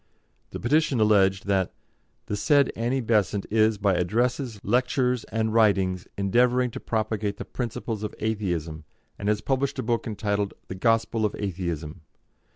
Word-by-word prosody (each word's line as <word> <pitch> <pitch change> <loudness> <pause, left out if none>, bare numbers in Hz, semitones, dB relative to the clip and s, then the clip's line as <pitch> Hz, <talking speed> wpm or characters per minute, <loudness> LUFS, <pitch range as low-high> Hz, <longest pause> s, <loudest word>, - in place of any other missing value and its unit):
The - - -6
petition 145 0 +2
alleged 95 -3 +3
that, 95 -2 0 0.5
"The 105 - -3
said 140 +5 +3
Annie 120 +4 0
Besant 105 -3 +1
is, 110 0 +3
by 100 -1 +2
addresses, 115 +6 0
lectures, 125 +2 +1
and 110 -1 -1
writings, 95 -5 +2
endeavouring 125 +5 +2
to - - -6
propagate 110 -2 -2
the 120 - -6
principles 115 -3 -4
of 105 -1 -5
Atheism, 85 -8 -2 0.4
and 100 - -1
has 105 0 +1
published 135 +3 -1
a - - -2
book 115 +1 -1
entitled 105 -2 -2
'The - - -3
Gospel 115 +2 +1
of 105 - 0
Atheism.' 85 -4 -4
110 Hz, 150 wpm, -26 LUFS, 100-120 Hz, 0.5 s, alleged